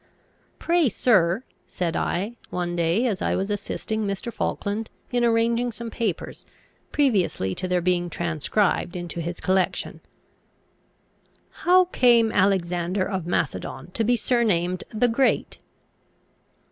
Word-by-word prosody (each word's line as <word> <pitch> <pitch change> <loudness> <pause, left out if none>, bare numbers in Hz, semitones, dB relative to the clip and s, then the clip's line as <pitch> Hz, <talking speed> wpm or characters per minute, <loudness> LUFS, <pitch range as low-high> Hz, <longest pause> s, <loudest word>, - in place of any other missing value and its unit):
"Pray, 335 -5 +2
sir," 195 -2 +2 0.2
said 170 -3 -2
I, 205 +7 -1
one 175 -1 -2
day 170 +7 +1
as 210 -7 -1
I - - +1
was 195 +2 -2
assisting 220 +1 -3
Mr. 200 +4 -4
Falkland 215 +2 -2 0.2
in 245 -1 +1
arranging 235 +1 +2
some 230 +1 -7
papers, 210 -8 -3 0.5
previously 195 - +1
to 185 - -4
their 180 -1 +1
being 175 0 +1
transcribed 170 +3 0
into 175 -1 -5
his 175 +2 -4
collection, 185 -1 0 1.5
"how 365 +1 +4
came 240 -9 +4
Alexander 185 -1 +1
of 190 -4 -3
Macedon 160 -1 -2
to 225 - -1
be 240 +3 +3
surnamed 185 -8 +1
the 230 +2 +2
Great?" 250 +3 +1
200 Hz, 120 wpm, -24 LUFS, 175-235 Hz, 1.5 s, how